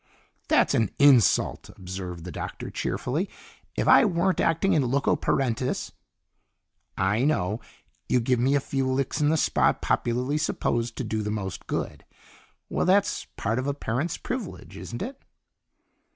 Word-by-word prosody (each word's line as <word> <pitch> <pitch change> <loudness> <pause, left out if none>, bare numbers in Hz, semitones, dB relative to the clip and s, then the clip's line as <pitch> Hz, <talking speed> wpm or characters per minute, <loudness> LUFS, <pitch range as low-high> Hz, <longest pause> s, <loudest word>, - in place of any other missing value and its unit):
"That's - - +3
an 110 -4 +2
insult," 140 -6 +4
observed 90 -2 -7
the 90 - -7
Doctor - - -6
cheerfully. 165 +10 -2 0.5
"If - - -1
I - - +8
weren't 185 -3 +1
acting 165 +4 +2
in 135 -6 +2
loco 140 +2 +2
parentis 130 -1 -1 0.6
" - - -49 0.2
"I 115 +4 +1
know! 110 -7 0 0.5
You'd 125 - +2
give 125 0 +2
me 135 +4 +3
a - - +4
few 135 -1 -1
licks 135 +3 -1
in 150 - +3
the 160 - +3
spot - - +2
popularly 125 +5 0
supposed 120 -6 -1
to - - -3
do 110 0 -2
the 105 - -3
most 95 -4 -4
good! - - -3 0.6
Well, - - -1
that's 200 +2 +2
part 115 +4 0
of 130 - -3
a 140 - -1
parent's 140 +5 -2
privilege, 245 -7 -6
isn't 120 - -6
it?" 265 +4 -7
130 Hz, 155 wpm, -26 LUFS, 115-155 Hz, 0.6 s, I